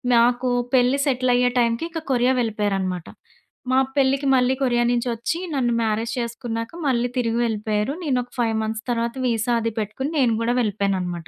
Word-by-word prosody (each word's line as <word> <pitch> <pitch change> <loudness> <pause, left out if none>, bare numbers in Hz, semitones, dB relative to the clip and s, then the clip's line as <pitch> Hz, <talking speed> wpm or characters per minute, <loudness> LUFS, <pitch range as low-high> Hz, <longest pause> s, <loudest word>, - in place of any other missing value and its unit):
నాకు 245 +2 +3 0.3
పెళ్లి 255 +2 +3
సెటిల‌య్యే 250 -1 +2
టైంకి 235 +6 +1
ఇంక 325 -1 -5
కొరియా 250 +1 +3
వెళ్ళిపోయారన్నమాట. 195 -5 -2 0.6
మా 260 - +4 0.2
పెళ్లికి 275 0 +2
మళ్ళీ 255 0 +3
కొరియా 240 -2 +2
నుంచి 245 0 0
వచ్చి 235 +9 -2 0.2
నన్ను 245 -3 +1
మ్యారేజ్ 225 +1 -1
చేసుకున్నాక 235 +1 -4
మళ్ళీ 245 -2 +1
తిరిగి 235 -1 0
వెళ్ళిపోయారు. 215 +3 -1
నేను 275 -5 +1
ఒక 245 - -19
5 225 -2 +1
మంత్స్ 220 0 -3
తర్వాత 235 0 0
వీసా 235 0 +1
అది 230 0 -1
పెట్టుకుని 220 +7 -3
నేను 245 -4 +3
గూడా 235 +1 +1
వెళ్ళిపోయానన్నమాట. 190 -5 -2
235 Hz, 160 wpm, -22 LUFS, 220-250 Hz, 0.6 s, మా